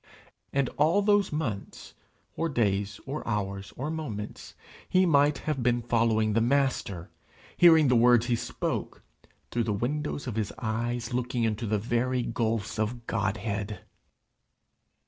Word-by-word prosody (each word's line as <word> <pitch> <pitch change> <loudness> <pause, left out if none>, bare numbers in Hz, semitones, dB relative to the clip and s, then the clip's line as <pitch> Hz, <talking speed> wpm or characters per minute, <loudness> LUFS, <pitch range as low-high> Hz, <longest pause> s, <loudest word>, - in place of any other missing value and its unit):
And 140 -1 +1
all 165 +8 +3
those 205 -1 +3
months, 130 -11 -4 0.4
or 165 - -1
days, 100 -6 0
or 140 +3 -4
hours, 100 -3 -3
or 145 +5 -3
moments, 120 -11 -6 0.3
he 185 0 +4
might 145 -3 +4
have 150 -2 -2
been 120 0 +1
following 115 -2 +2
the 115 - +3
Master, 120 -9 0 0.4
hearing 160 -4 +7
the 125 - +4
words 120 0 +5
he 120 -1 +1
spoke, - - -4 0.5
through 120 -1 0
the 105 - 0
windows 145 +7 -2
of 120 -4 -4
his 110 -3 -1
eyes 120 +2 -2
looking 125 0 -1
into 110 0 -1
the 105 +1 +1
very 120 +3 0
gulfs 110 -3 -2
of 115 +2 -2
Godhead! 105 -1 -2
120 Hz, 140 wpm, -28 LUFS, 110-140 Hz, 0.5 s, hearing